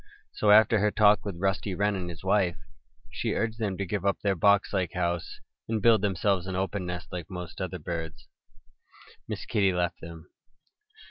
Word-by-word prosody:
So 105 - 0
after 110 +1 +6
her 105 +1 +3
talk 105 0 +4
with 100 -4 -4
Rusty 95 +1 -1
Wren 105 +2 +1
and 90 -2 -4
his 85 0 -9
wife, 95 -2 +2
when - - -25
she - - -2
urged 115 0 -2
them 100 -4 -2
to 100 - -2
give 95 +2 -3
up 100 0 +1
their 100 -1 +2
boxlike 95 -1 +2
house 85 -1 -2 0.3
and 110 -1 0
build 110 -1 +4
themselves 95 -1 0
an 95 - -3
open 95 0 -2
nest 90 0 -6
like 85 -2 -6
most 90 -1 -7
other 95 -2 -3
birds, 80 -1 -6 1.0
Miss - - -5
Kitty 100 -2 +2
left 90 -1 -2
them. 85 -1 -11
95 Hz, 185 wpm, -27 LUFS, 90-105 Hz, 1.0 s, after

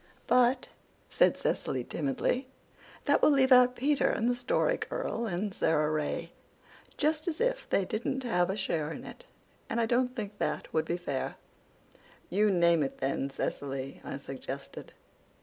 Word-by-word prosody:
"But," 250 +1 +3 0.4
said - - +3
Cecily - - -1
timidly, 265 -1 -1 0.6
"that - - +3
will - - +6
leave 270 -2 +4
out 250 0 +7
Peter 285 +3 +2
and 225 - 0
the 245 - +3
Story 245 - +1
Girl 235 - -3
and 195 +1 -2
Sara 155 -3 +2
Ray, 155 -1 -2 0.7
just 310 +3 0
as 330 -2 -2
if - - 0
they 195 - +2
didn't 240 +6 -2
have 180 -7 +1
a 190 - -1
share 160 -6 -1
in - - -7
it. - - -11 0.4
I 235 0 +1
don't 250 +2 +1
think 205 -3 -6
that - - -2
would 160 - +1
be 170 - -1
fair." 140 -7 -3 1.0
"You 210 +3 +3
name 170 -3 +4
it 135 - -2
then, 135 0 -1
Cecily," 135 0 -4
I - - -5
suggested. 135 0 -8
215 Hz, 155 wpm, -30 LUFS, 160-255 Hz, 1.0 s, out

